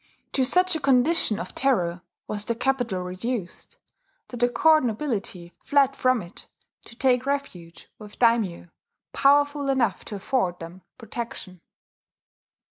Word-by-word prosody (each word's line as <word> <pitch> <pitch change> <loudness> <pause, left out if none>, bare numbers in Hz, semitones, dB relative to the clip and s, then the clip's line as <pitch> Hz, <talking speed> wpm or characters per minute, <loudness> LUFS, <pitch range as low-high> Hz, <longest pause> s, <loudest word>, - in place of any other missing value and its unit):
To 265 - +2
such 365 +6 +2
a - - -1
condition 260 -4 +3
of - - -7
terror 180 -10 0 0.3
was 210 0 -4
the 235 - -1
capital 240 -7 -1
reduced 185 +2 -5 0.5
that 245 - -7
the 245 +1 +2
court 310 +4 +4
nobility 210 -8 -4
fled 275 -2 +2
from 255 -4 +1
it 170 +3 -13 0.4
to 235 - -14
take 255 +1 +1
refuge 195 -13 -5
with 210 -1 -12
daimyo 225 -8 +1 0.4
powerful 285 0 +3
enough 240 -8 0
to 210 - -6
afford 195 -3 -1
them 170 +2 -10 0.2
protection. 230 -6 -8
240 Hz, 130 wpm, -25 LUFS, 190-270 Hz, 0.5 s, court